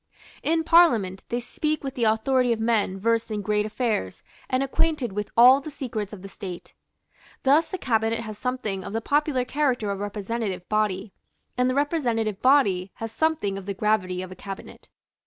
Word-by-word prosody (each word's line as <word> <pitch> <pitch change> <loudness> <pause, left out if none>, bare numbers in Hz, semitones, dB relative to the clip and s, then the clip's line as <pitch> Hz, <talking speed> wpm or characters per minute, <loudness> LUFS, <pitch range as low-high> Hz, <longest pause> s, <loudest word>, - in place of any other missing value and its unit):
In 325 +1 +1
Parliament 235 - +4
they 240 - -1
speak 305 +5 -2
with 270 -1 -4
the 240 -3 0
authority 245 +3 +2
of 230 - 0
men 220 -4 +1
versed 230 +2 +1
in 210 -2 -3
great 210 +1 +1
affairs 215 - -2 0.3
and 255 +1 +1
acquainted 275 -4 0
with 210 +1 -3
all 255 +4 +8
the 310 - -7
secrets 225 -8 -5
of 200 -3 -10
the - - -7
State. 185 -2 -8 0.7
Thus 290 +5 +4
the 375 - -3
Cabinet 225 -6 0
has 215 -2 -7
something 215 -5 -3
of - - -7
the 225 - 0
popular 285 -1 +1
character 250 -7 0
of 200 - -4
a - - -3
representative 205 -2 -4
body; 210 -2 0 0.4
and 250 +1 +2
the 255 - 0
representative 240 - 0
body 205 -9 +3
has 225 -1 -6
something 225 -9 0
of 195 - -12
the 200 - -3
gravity 185 -3 0
of 185 - -9
a - - -8
cabinet. 195 +1 -9
225 Hz, 185 wpm, -25 LUFS, 200-260 Hz, 0.7 s, all